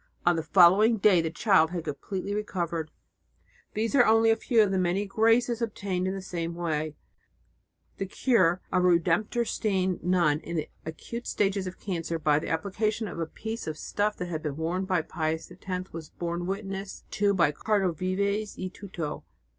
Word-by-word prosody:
On 175 0 +5
the 165 - 0
following 190 +7 +6
day 195 -4 +5
the 165 - -2
child 170 -1 +3
had 175 -1 -4
completely 185 +7 -4
recovered. 170 -6 -2 0.9
These 225 +3 -1
are 265 -3 +7
only 225 0 +5
a - - +4
few 225 0 +3
of 200 - 0
the 190 - +1
many 185 +3 +1
graces 225 +3 +2
obtained 195 -5 -2
in 190 - -2
the 195 - -6
same 170 -2 -4
way. 155 -3 -2 1.0
The 195 - -2
cure 185 -6 +2
of 180 -1 +2
a - - +5
Redemptoristine 185 +2 +1
nun 170 -4 +2
in 170 - -6
the 155 -2 -2 0.2
acute 235 +9 -6
stages 195 -2 0
of 185 - -8
cancer 170 -4 -3
by 150 -2 +2
the - - -5
application 210 +6 -1
of 170 - -7
a 165 - -1
piece 220 +4 -6
of 155 -1 -4
stuff 210 +5 -1
that 180 - -3
had 160 -2 -3
been 150 -2 -4
worn 175 +4 -1
by 185 -4 +1
Pius 160 0 -3
X 185 -1 -6
was 160 -2 -7
borne 175 0 -4
witness 195 0 -5
to 200 0 +2
by 170 -5 +4
Cardinal 195 +3 +1
Vives 200 +5 -1
y 185 0 -4
Tuto. 175 -7 -6
185 Hz, 180 wpm, -28 LUFS, 165-205 Hz, 1.0 s, are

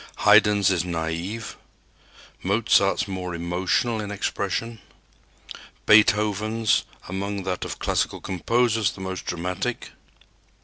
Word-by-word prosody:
Haydn's 105 -2 +5
is 90 -3 +1
naive; 85 +5 -4 0.9
Mozart's 100 0 +2
more 90 -2 -5
emotional 90 +7 -1
in 105 - -6
expression; 105 +3 -3 1.1
Beethoven's, 105 +1 +3 0.2
among 100 +1 -4
that 90 -1 -3
of - - -6
classical - - -1
composers, 110 +3 +1
the - - -11
most 95 -1 -5
dramatic. 90 +1 -3
100 Hz, 95 wpm, -24 LUFS, 90-105 Hz, 1.1 s, Haydn's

